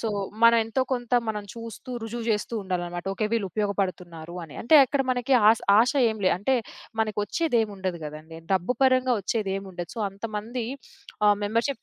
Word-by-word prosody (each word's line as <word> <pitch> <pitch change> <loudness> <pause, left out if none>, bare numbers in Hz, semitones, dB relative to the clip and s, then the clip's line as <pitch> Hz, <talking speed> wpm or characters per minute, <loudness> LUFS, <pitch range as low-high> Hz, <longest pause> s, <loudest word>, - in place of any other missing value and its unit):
So, 225 - -1 0.3
మనం 230 0 +8
ఎంతో 225 +4 -1
కొంత 245 -1 -3 0.2
మనం 210 -1 -3
చూస్తూ, 230 +2 -9
రుజువు 230 +1 -5
చేస్తూ 215 +2 -1
ఉండాలనమాట. 175 -1 -4
ఓకే. 215 - -1
వీళ్ళు 220 -4 +1
ఉపయోగపడుతున్నారు 180 -4 -3
అని. 150 - -13
అంటే 275 +7 +4
అక్కడ 270 +2 0
మనకి 250 +2 0 0.2
ఆస 225 - +2 0.2
ఆశ 240 +4 +4 0.2
ఏమి 215 -2 -6
లేదు. 185 - +4
అంటే 235 +8 +1 0.5
మనకు 215 -2 -1
వచ్చేదేముండదు 205 - -1
గదండీ! 155 +2 -9
డబ్బు 190 +6 +1
పరంగా 255 -1 +4
ఒచ్చేదేముండదు. 195 -4 -3
సో, - - -3
అంతమంది 220 +4 -5 0.6
ఆహ్, 205 -1 +5
మెంబర్‌షిప్ 230 +6 -1
215 Hz, 155 wpm, -26 LUFS, 190-235 Hz, 0.6 s, మనం